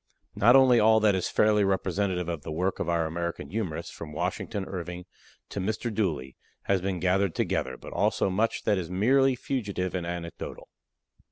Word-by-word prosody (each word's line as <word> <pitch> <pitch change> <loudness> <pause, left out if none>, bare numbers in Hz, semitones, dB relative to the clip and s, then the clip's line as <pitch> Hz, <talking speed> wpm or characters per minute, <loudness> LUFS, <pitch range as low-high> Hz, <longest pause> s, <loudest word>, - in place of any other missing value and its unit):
Not 115 +5 +5
only 130 -3 +6
all 110 +1 +5
that 105 -1 +4
is 95 -1 -1
fairly 105 -1 +3
representative 95 -2 0
of 85 -3 -3
the 75 - -7
work 90 +5 -1
of 85 - -2
our 85 -1 +1
American 85 +2 -4
humorists, 90 -6 -3
from 75 -2 -9
Washington 95 +5 -3
Irving 90 -1 -6 0.4
to - - -4
"Mr. 110 +4 -2
Dooley," 80 -12 -2 0.3
has 95 -2 +1
been 95 -1 -2
gathered 95 +1 +1
together, 65 -1 -1
but - - -10
also - - +1
much 110 +5 0
that 105 -3 +2
is 85 -3 -5
merely 130 +8 +3
fugitive 100 -8 -3
and 90 -2 -3
anecdotal. 85 -1 -6
95 Hz, 175 wpm, -27 LUFS, 85-105 Hz, 0.4 s, only